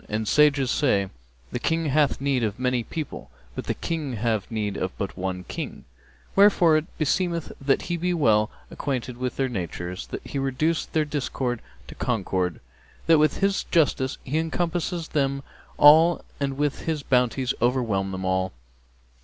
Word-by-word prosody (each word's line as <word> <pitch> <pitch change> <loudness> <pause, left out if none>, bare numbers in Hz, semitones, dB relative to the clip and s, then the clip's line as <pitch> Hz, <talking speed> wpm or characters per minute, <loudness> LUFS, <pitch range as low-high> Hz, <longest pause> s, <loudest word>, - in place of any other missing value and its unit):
And 110 +1 -2
sages 140 -1 +4
say, 100 -10 +2 0.4
'The 125 - -2
King 165 +4 0
hath 145 -1 +2
need 135 -3 +1
of 105 -1 -1
many 125 -1 +1
people, 155 +4 -6 0.2
but - - -5
the - - -1
people 155 -6 -3
have 110 -3 -1
need 105 -3 -2
of 95 - -3
but 100 - -4
one 90 -1 -3
King' - - -6 0.5
wherefore 195 -5 +6
it 155 +2 -5
beseemeth 170 +2 0
that 135 0 +2
he 175 - -2
be 180 +2 0
well 110 -10 +3 0.2
acquainted 125 -3 -3
with 125 0 -3
their 135 - 0
natures, 90 - -5
that - - -7
he 140 - -3
reduce 135 +5 0
their 155 -1 0
discord 130 -4 -2 0.2
to - - -10
concord, 95 -7 -1 0.5
that 165 -2 +5
with 155 +4 +2
his 195 0 +1
justice 140 -5 +1
be 145 +4 0
encompass 165 +1 -1 0.2
them 140 -1 0 0.3
all 160 +4 +7
and 135 -1 -2
with 145 -1 -1
his 155 -3 -1
bounties 125 0 +1
overwhelm 115 -6 +1
them 95 0 -4
all. 95 0 0
135 Hz, 160 wpm, -25 LUFS, 110-155 Hz, 0.5 s, all